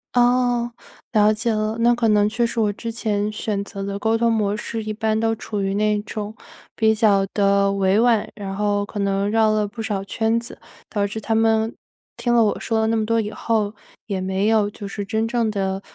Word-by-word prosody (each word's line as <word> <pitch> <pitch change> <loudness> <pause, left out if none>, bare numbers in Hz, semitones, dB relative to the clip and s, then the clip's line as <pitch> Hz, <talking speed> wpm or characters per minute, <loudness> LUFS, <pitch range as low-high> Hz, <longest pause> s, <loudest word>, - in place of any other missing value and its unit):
哦， 245 -1 +3 0.4
了 215 -1 +4
解 230 +2 -1
了， 215 +1 -1
那 240 +1 +4
可 235 -1 +1
能 210 -1 +4
确 235 +2 0
实 230 - -3
我 210 -2 +2
之 230 +3 -5
前 215 -2 -1
选 210 -1 -2
择 200 -1 -7
的 200 0 -4
沟 225 +1 +1
通 230 0 +2
模 210 -2 +1
式 225 -1 -4
一 215 - -4
般 220 0 0
都 225 0 +1
处 210 -1 -4
于 195 0 -1
那 210 0 +1
种 215 0 -6 0.4
比 220 -1 +3
较 205 -3 +3
地 200 0 +2
委 195 +1 +2
婉， 230 -3 +3
然 195 -2 -5
后 205 0 0
可 205 - -7
能 200 0 0
绕 220 0 +3
了 215 -1 +1
不 225 +3 -8
少 205 -3 -2
圈 225 +3 0
子， 235 - -9 0.3
导 205 -2 0
致 210 +2 -4
他 225 +1 0
们 225 0 +2 0.4
听 240 -1 0
了 230 -1 +5
我 210 - 0
说 225 -1 -1
了 220 - +2
那 225 - +1
么 215 -1 0
多 230 0 +2
以 210 - -4
后， 215 -2 -1 0.3
也 195 -3 -2
没 190 +2 0
有 220 -2 +3
就 200 - -8
是 200 0 -5
真 220 +1 -1
正 230 -2 0
地， 195 -1 -2
215 Hz, 235 characters per minute, -22 LUFS, 205-225 Hz, 0.4 s, 了